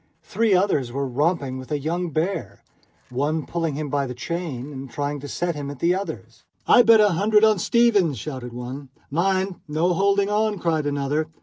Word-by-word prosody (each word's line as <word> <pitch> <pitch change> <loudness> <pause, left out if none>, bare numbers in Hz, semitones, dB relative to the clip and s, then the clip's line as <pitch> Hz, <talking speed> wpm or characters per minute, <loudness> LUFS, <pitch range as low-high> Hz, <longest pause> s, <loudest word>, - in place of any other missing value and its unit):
Three 215 -1 +1
others 150 -10 +1
were 140 +2 -2
romping 140 0 -1
with 130 +3 -11
a 150 - +1
young 170 +5 -2
bear, 155 - -3 0.5
one 145 +4 -1
pulling 165 -4 -2
him 150 0 -4
by 140 0 0
the 125 - -6
chain 150 -3 -5
and 135 0 -7
trying 145 +2 -3
to 145 - -8
set 175 +4 -2
him 145 -2 -5
at 145 - -7
the 170 +7 +2
others. 195 +2 -6 0.2
"I - - +7
bet 230 -1 +6
a 210 -1 +5
hundred 210 +4 +3
on 215 -3 +5
Stevens!" 205 - +3
shouted 130 0 -6
one. 125 +3 -7 0.2
"Mind, 190 +3 0
no 160 +4 +1
holding 200 +2 +2
on!" 210 0 +1
cried 160 -4 0
another. 145 +2 -1
160 Hz, 190 wpm, -23 LUFS, 140-190 Hz, 0.5 s, I